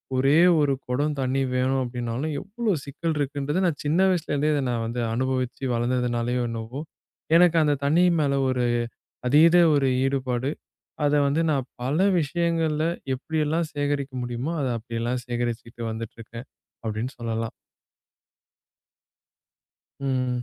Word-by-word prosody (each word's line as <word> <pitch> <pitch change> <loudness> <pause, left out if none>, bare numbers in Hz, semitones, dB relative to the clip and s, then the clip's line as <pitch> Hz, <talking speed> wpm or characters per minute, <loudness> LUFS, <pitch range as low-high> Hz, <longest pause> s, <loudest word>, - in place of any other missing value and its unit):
ஒரே 135 +4 +4 0.2
ஒரு 145 -2 +2 0.2
குடம் 145 +4 0
தண்ணி 130 +1 0
வேணும் 130 +1 +1
அப்டினாலும், 120 +4 -3
எவ்ளோ 215 +3 -2
சிக்கல் 155 +3 -3
இருக்குன்றத, 145 +4 -1
நான் 165 -5 0
சின்ன 155 +4 +2
வயசுல 180 -4 -1
இருந்தே 145 +2 +2
இத 145 - +1
நான் 120 -2 -1
வந்து 120 +2 -3
அனுபவிச்சு 130 +1 -2
வளர்ந்ததுனாலயோ 120 0 0
என்னவோ, 115 +5 -5 0.6
எனக்கு 170 -1 +5
அந்த 150 -1 +2
தண்ணி 160 +5 +4 0.2
மேல 140 -2 +1 0.2
ஒரு 125 -1 +1 0.6
அதீத 165 +5 +6 0.2
ஒரு 140 -2 +3 0.2
ஈடுபாடு. 130 -1 0 0.6
அத 145 - +2
வந்து 155 +4 +1
நான் 135 -3 -1
பல 140 +6 0 0.2
விஷயங்கள்ல 160 0 0 0.3
எப்டி 160 +5 -4
எல்லாம் 160 +2 0
சேகரிக்க 145 -1 -1
முடியுமோ 120 +7 -3 0.2
அப்டி 115 0 -6
எல்லாம் 125 +1 -1
சேகரிச்சுட்டு 120 -1 -4
வந்துட்டு 115 0 -7
இருக்கேன் 115 +3 -9 0.4
அப்டின்னு 110 +5 -3
சொல்லலாம். 115 0 -2 2.5
ம். 125 -2 -1
135 Hz, 130 wpm, -25 LUFS, 120-150 Hz, 2.5 s, அதீத